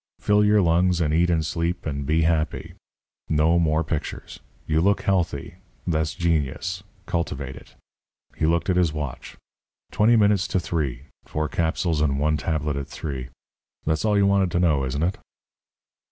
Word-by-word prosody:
Fill 105 Hz, 0 st, +3 dB
your 105 Hz, -1 st, +4 dB
lungs 90 Hz, +1 st, +3 dB
and 75 Hz, -3 st, +1 dB
eat 85 Hz, +2 st, +3 dB
and 80 Hz, -2 st, +1 dB
sleep 85 Hz, +3 st, -2 dB
and 70 Hz, -3 st, -3 dB
be 80 Hz, +2 st, +2 dB
happy. 80 Hz, -1 st, 0 dB, 0.6 s
No 80 Hz, +3 st, +3 dB
more 80 Hz, -1 st, +2 dB
pictures. 80 Hz, -2 st, -5 dB, 0.3 s
You 80 Hz, +1 st, +1 dB
look 100 Hz, +3 st, +2 dB
healthy. 85 Hz, -3 st, -1 dB, 0.3 s
That's 80 Hz, -3 st, 0 dB
genius. 85 Hz, +2 st, -1 dB, 0.2 s
Cultivate 75 Hz, -7 st, -3 dB
it." -, -, -15 dB, 0.6 s
He 80 Hz, -, 0 dB
looked 85 Hz, +3 st, +1 dB
at 90 Hz, -, +1 dB
his 85 Hz, -4 st, +2 dB
watch. 75 Hz, -4 st, -6 dB, 0.5 s
"Twenty 110 Hz, +3 st, +4 dB
minutes 105 Hz, -3 st, +3 dB
to 95 Hz, -, 0 dB
three. 70 Hz, -8 st, -2 dB, 0.2 s
Four 75 Hz, 0 st, -2 dB
capsules 80 Hz, -1 st, 0 dB
and 70 Hz, -3 st, +1 dB
one 75 Hz, +1 st, +2 dB
tablet 75 Hz, -2 st, -1 dB
at 70 Hz, -1 st, -4 dB
three. 65 Hz, -4 st, -6 dB, 0.6 s
That's 80 Hz, 0 st, 0 dB
all 105 Hz, -1 st, +2 dB
you 100 Hz, -, +4 dB
wanted 100 Hz, -2 st, +3 dB
to 85 Hz, -, +2 dB
know, 75 Hz, -6 st, +2 dB
isn't 70 Hz, +4 st, -2 dB
it?" 90 Hz, +3 st, -1 dB
80 Hz, 165 wpm, -24 LUFS, 75-90 Hz, 0.6 s, your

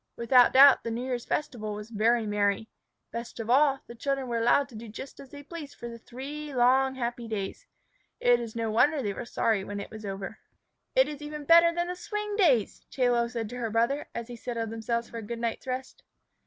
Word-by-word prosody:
Without 245 Hz, +1 st, +5 dB
doubt 275 Hz, 0 st, +8 dB
the -, -, -3 dB
New 230 Hz, +2 st, -3 dB
Year's 250 Hz, -2 st, -3 dB
festival 220 Hz, -8 st, -3 dB
was 210 Hz, +2 st, -8 dB
very 230 Hz, +1 st, +2 dB
merry. 205 Hz, +1 st, 0 dB, 0.4 s
Best 235 Hz, 0 st, -6 dB
of 225 Hz, +1 st, -2 dB
all, 275 Hz, 0 st, +4 dB
the -, -, -10 dB
children 275 Hz, +2 st, -2 dB
were 235 Hz, -1 st, -1 dB
allowed 240 Hz, +4 st, +3 dB
to 240 Hz, -, -13 dB
do 225 Hz, +2 st, -8 dB
just 230 Hz, +5 st, -9 dB
as 275 Hz, -, -11 dB
they 285 Hz, +1 st, -10 dB
pleased 305 Hz, -2 st, -9 dB
for 235 Hz, -, -7 dB
the 230 Hz, 0 st, -8 dB
three 280 Hz, +5 st, -7 dB
long, 265 Hz, +2 st, +4 dB
happy 240 Hz, -2 st, -3 dB
days. 215 Hz, -, -5 dB, 0.5 s
It 245 Hz, 0 st, +4 dB
is 230 Hz, -2 st, -6 dB
no 225 Hz, -1 st, -1 dB
wonder 285 Hz, +6 st, +3 dB
they 205 Hz, -2 st, -1 dB
were 240 Hz, -, -6 dB
sorry 225 Hz, -4 st, 0 dB
when 205 Hz, +1 st, -5 dB
it 200 Hz, -, -7 dB
was 220 Hz, 0 st, -9 dB
over. 195 Hz, -1 st, -6 dB, 0.6 s
"It -, -, +5 dB
is 295 Hz, -1 st, -7 dB
even 300 Hz, 0 st, -6 dB
better 335 Hz, +2 st, +7 dB
than 345 Hz, +1 st, -1 dB
the 360 Hz, -, -3 dB
Swing 420 Hz, +2 st, -4 dB
Days," 285 Hz, -, +2 dB
Chie 250 Hz, -2 st, +1 dB
Lo 235 Hz, -1 st, +2 dB
said 235 Hz, -2 st, -4 dB
to 245 Hz, -, -7 dB
her 235 Hz, -2 st, -2 dB
brother, 235 Hz, +6 st, 0 dB
as 235 Hz, -, -3 dB
they 240 Hz, +1 st, -9 dB
settled 230 Hz, -1 st, -4 dB
themselves 235 Hz, +1 st, -2 dB
for 235 Hz, -, -8 dB
a -, -, -6 dB
good 230 Hz, +2 st, -5 dB
night's 230 Hz, +2 st, -3 dB
rest. 255 Hz, 0 st, -5 dB
240 Hz, 225 wpm, -28 LUFS, 225-275 Hz, 0.6 s, doubt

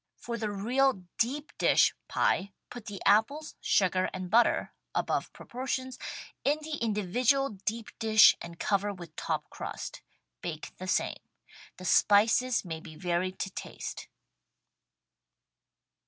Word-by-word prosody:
For 235 Hz, -, -5 dB
the 220 Hz, -2 st, -2 dB
real 235 Hz, +2 st, +1 dB, 0.2 s
deep 285 Hz, +6 st, -1 dB
dish -, -, +5 dB
pie 195 Hz, +1 st, +1 dB, 0.2 s
put 245 Hz, -3 st, -9 dB
the 200 Hz, -2 st, -6 dB
apples, 280 Hz, +9 st, +3 dB
sugar 185 Hz, -1 st, +2 dB
and 185 Hz, -1 st, -5 dB
butter 235 Hz, +2 st, +3 dB, 0.2 s
(above -, -, 0 dB
proportions) 260 Hz, +1 st, -4 dB, 0.4 s
in 290 Hz, +2 st, +3 dB
the 305 Hz, -1 st, -4 dB
individual 235 Hz, +6 st, +1 dB, 0.2 s
deep 225 Hz, 0 st, -2 dB
dish 220 Hz, -2 st, +7 dB
and 170 Hz, 0 st, -8 dB
cover 205 Hz, +2 st, 0 dB
with 175 Hz, -5 st, -10 dB
top -, -, -3 dB
crustt., -, -, -6 dB, 0.4 s
Bake 160 Hz, -3 st, -6 dB
the 185 Hz, -, -7 dB
same. 185 Hz, -, +1 dB, 0.6 s
The 185 Hz, -, -9 dB
spices 225 Hz, +6 st, +4 dB
may 160 Hz, -2 st, -5 dB
be 160 Hz, -1 st, -11 dB
varied 180 Hz, +2 st, -1 dB
to 195 Hz, -, -3 dB
taste. -, -, -7 dB
210 Hz, 125 wpm, -30 LUFS, 185-250 Hz, 0.6 s, dish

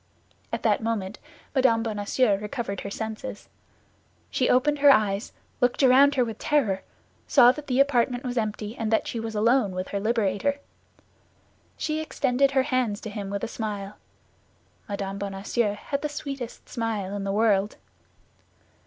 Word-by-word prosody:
At -, -, -3 dB
that -, -, +2 dB
moment 215 Hz, -3 st, -3 dB, 0.3 s
Mme. 255 Hz, -5 st, +3 dB
Bonacieux 215 Hz, +1 st, +1 dB
recovered 210 Hz, -3 st, -4 dB
her 200 Hz, -, -5 dB
senses. 220 Hz, +4 st, -6 dB, 0.8 s
She 255 Hz, -, +1 dB
opened 290 Hz, +4 st, +3 dB
her 285 Hz, 0 st, +7 dB
eyes, 210 Hz, -4 st, +3 dB, 0.3 s
looked 245 Hz, +3 st, +2 dB
around 275 Hz, +2 st, +6 dB
her 250 Hz, -2 st, +3 dB
with 225 Hz, -2 st, -6 dB
terror, 215 Hz, -11 st, +1 dB, 0.5 s
saw 245 Hz, -3 st, +7 dB
that 295 Hz, +2 st, -9 dB
the 255 Hz, -1 st, +1 dB
apartment 250 Hz, -3 st, +2 dB
was 250 Hz, -1 st, -3 dB
empty 215 Hz, -1 st, -2 dB
and 225 Hz, -3 st, -2 dB
that 220 Hz, -, +2 dB
she 235 Hz, -, -3 dB
was 225 Hz, -1 st, -5 dB
alone 225 Hz, -1 st, +3 dB
with 185 Hz, 0 st, -4 dB
her 200 Hz, -, -2 dB
liberator. 220 Hz, +4 st, 0 dB, 1.2 s
She 310 Hz, 0 st, -2 dB
extended 275 Hz, -3 st, +1 dB
her 270 Hz, -1 st, +2 dB
hands 250 Hz, -6 st, 0 dB
to 215 Hz, -, -6 dB
him 205 Hz, -2 st, -5 dB
with 200 Hz, 0 st, -4 dB
a -, -, 0 dB
smile. 210 Hz, -3 st, -5 dB, 0.9 s
Mme. 200 Hz, -1 st, -4 dB
Bonacieux 200 Hz, +2 st, -1 dB
had 280 Hz, +6 st, -4 dB
the 300 Hz, -, -2 dB
sweetest 275 Hz, -4 st, -6 dB
smile 215 Hz, -4 st, -3 dB
in 200 Hz, -, -3 dB
the 195 Hz, -, -2 dB
world. 205 Hz, -1 st, +2 dB
225 Hz, 155 wpm, -26 LUFS, 205-260 Hz, 1.2 s, her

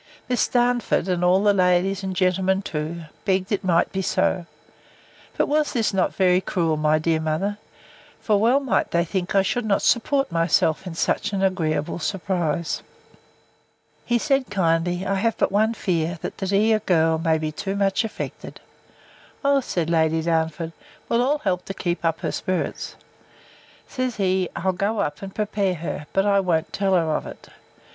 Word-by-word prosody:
Miss 250 Hz, -1 st, +1 dB
Darnford, 245 Hz, -4 st, +1 dB
and 180 Hz, -1 st, 0 dB
all 185 Hz, +2 st, +4 dB
the 205 Hz, -1 st, +5 dB
ladies, 185 Hz, +1 st, +2 dB
and 190 Hz, -1 st, -3 dB
the -, -, -8 dB
gentlemen 190 Hz, +1 st, +1 dB
too, 160 Hz, +1 st, -4 dB, 0.2 s
begged 190 Hz, 0 st, 0 dB
it 205 Hz, -, 0 dB
might 170 Hz, -2 st, +2 dB
be 190 Hz, -, -2 dB
so. 175 Hz, -1 st, 0 dB, 0.9 s
But -, -, +2 dB
was 300 Hz, 0 st, 0 dB, 0.2 s
not 190 Hz, -1 st, +2 dB
this -, -, -23 dB
very 185 Hz, -1 st, +4 dB
cruel, 165 Hz, -4 st, 0 dB
my 155 Hz, 0 st, +2 dB
dear 160 Hz, +1 st, +1 dB
mother? 160 Hz, +7 st, -2 dB, 0.6 s
For 210 Hz, -2 st, +1 dB
well 240 Hz, +6 st, +4 dB
might 270 Hz, -4 st, 0 dB
they 170 Hz, 0 st, +1 dB
think 180 Hz, +2 st, -3 dB
I 195 Hz, -, +5 dB
should 245 Hz, +5 st, -1 dB
not 205 Hz, -2 st, +1 dB
support 275 Hz, 0 st, +2 dB
myself 165 Hz, +1 st, +1 dB
in 170 Hz, -, -6 dB
such 185 Hz, -, 0 dB
an 195 Hz, -1 st, 0 dB
agreeable 165 Hz, -5 st, 0 dB
surprise. 170 Hz, -3 st, -2 dB, 1.2 s
He 240 Hz, -, +1 dB
said, 275 Hz, +1 st, 0 dB
kindly, 175 Hz, -1 st, 0 dB
I 195 Hz, -, 0 dB
have 220 Hz, +3 st, 0 dB
but -, -, +1 dB
one 220 Hz, +3 st, +2 dB
fear, 170 Hz, -4 st, -1 dB
that -, -, -5 dB
the 195 Hz, -, -2 dB
dear 215 Hz, +3 st, +3 dB
girl 165 Hz, -5 st, +2 dB
may 160 Hz, -1 st, +2 dB
be 155 Hz, -1 st, -3 dB
too 195 Hz, +5 st, -4 dB
much 200 Hz, +2 st, +1 dB
affected. 225 Hz, -, -6 dB, 0.9 s
O, 280 Hz, 0 st, +4 dB
said 175 Hz, -9 st, -2 dB
Lady 160 Hz, -1 st, +2 dB
Darnford, 160 Hz, 0 st, -1 dB, 0.4 s
we'll 235 Hz, -, +2 dB
all 280 Hz, +4 st, +2 dB
help 185 Hz, -8 st, -2 dB
to 195 Hz, -, -6 dB
keep 175 Hz, -2 st, -2 dB
up 165 Hz, -1 st, 0 dB
her -, -, -1 dB
spirits. 185 Hz, -1 st, -3 dB, 0.9 s
Says 255 Hz, -2 st, -3 dB
he, 185 Hz, -2 st, 0 dB
I'll 190 Hz, +2 st, 0 dB
go 200 Hz, +4 st, -1 dB
up, 150 Hz, -6 st, -2 dB
and 195 Hz, -1 st, -8 dB
prepare 205 Hz, -3 st, 0 dB
her; 155 Hz, -2 st, -5 dB
but 195 Hz, +1 st, +1 dB, 0.2 s
won't 165 Hz, -3 st, 0 dB
tell 195 Hz, -1 st, +1 dB
her 175 Hz, -, +4 dB
of -, -, -3 dB
it. -, -, -11 dB
185 Hz, 175 wpm, -23 LUFS, 165-205 Hz, 1.2 s, the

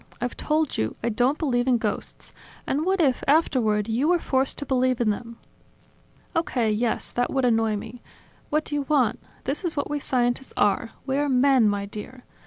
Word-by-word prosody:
I've 245 Hz, 0 st, -3 dB
told 310 Hz, -1 st, 0 dB
you: 110 Hz, 0 st, -1 dB
I 235 Hz, -, +1 dB
don't 250 Hz, +6 st, +1 dB
believe 245 Hz, -5 st, 0 dB
in 250 Hz, -2 st, +4 dB
ghosts. 215 Hz, -3 st, -5 dB, 0.3 s
And 295 Hz, +4 st, -1 dB
what 385 Hz, 0 st, +2 dB
if, 270 Hz, -7 st, +2 dB
afterward, 240 Hz, -9 st, +2 dB
you 235 Hz, +6 st, +1 dB
were 355 Hz, +1 st, +4 dB
forced 265 Hz, -4 st, 0 dB
to 285 Hz, -, -5 dB
believe 255 Hz, -2 st, +1 dB
in 225 Hz, -3 st, +2 dB
them?" 230 Hz, +2 st, -6 dB, 1.0 s
"Okay, 245 Hz, -9 st, +1 dB
yes; 225 Hz, +2 st, -1 dB
that 245 Hz, 0 st, -1 dB
would 265 Hz, -2 st, +1 dB
annoy 225 Hz, -2 st, +2 dB
me. 225 Hz, +4 st, -8 dB, 0.5 s
What 305 Hz, +1 st, 0 dB
do -, -, -7 dB
you 290 Hz, -, +1 dB
want? 265 Hz, -7 st, +2 dB, 0.2 s
This 275 Hz, +7 st, -3 dB
is 335 Hz, -4 st, -3 dB
what 285 Hz, -, -2 dB
we 295 Hz, -, -1 dB
scientists 245 Hz, -1 st, -1 dB
are: 205 Hz, +3 st, +2 dB, 0.2 s
we 270 Hz, 0 st, 0 dB
are 290 Hz, 0 st, +1 dB
men, 255 Hz, -3 st, +4 dB
my 200 Hz, -1 st, -1 dB
dear. 215 Hz, +5 st, -9 dB
250 Hz, 195 wpm, -25 LUFS, 225-285 Hz, 1.0 s, in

